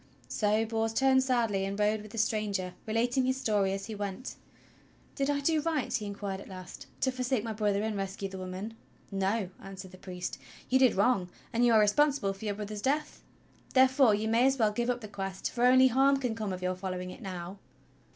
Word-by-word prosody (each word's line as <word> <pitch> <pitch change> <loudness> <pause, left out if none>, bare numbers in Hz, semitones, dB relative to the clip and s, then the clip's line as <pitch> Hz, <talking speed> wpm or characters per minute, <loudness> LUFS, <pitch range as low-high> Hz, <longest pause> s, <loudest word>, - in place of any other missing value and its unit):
So 215 +1 +1
Bors 225 0 -1
turned 265 +2 +4
sadly 235 -7 +1
and 195 +1 -3
rode 210 +1 +2
with 215 - -11
the 230 - -9
stranger, 210 -4 0
relating 240 +4 +1
his 260 0 +1
story 205 -6 +1
as 195 0 -3
he 220 - -6
went. 205 +4 -5 0.8
"Did 275 0 -1
I 285 0 +1
do 310 +2 +2
right," 310 -3 -1
he 215 -5 -2
inquired 200 -1 -4
at - - -12
last, 185 -1 -9
"to 260 - +2
forsake 255 -2 -1
my 225 -1 -3
brother 205 -1 0
and 220 -1 -1
rescue 195 0 -3
the 190 -1 -8
woman.?" 185 +4 -5 0.4
"No," 195 0 0
answered 190 -1 -9
the 185 - -14
priest, 180 -1 -6 0.3
"you 260 - +4
did 260 -3 +5
wrong, 200 -3 +2 0.2
and 235 +1 +2
you 240 - +5
are 220 - +7
responsible 210 0 +3
for 195 +3 -9
your 205 -1 -1
brother's 210 0 -5
death. 290 +5 -1 0.5
Therefore 260 -3 +6
you 215 +2 -2
may 230 +3 +4
as 270 0 +2
well 220 -4 +3
give 240 +3 -1
up 245 0 0
the 215 - -7
Quest, 195 -2 -4
for 245 0 +1
only 260 +1 +7
harm 270 +3 +4
can 250 -4 -1
come 215 -3 -3
of 185 0 -5
your 185 0 +1
following 185 -1 -5
it - - -11
now." 185 0 -6
215 Hz, 215 wpm, -30 LUFS, 195-250 Hz, 0.8 s, are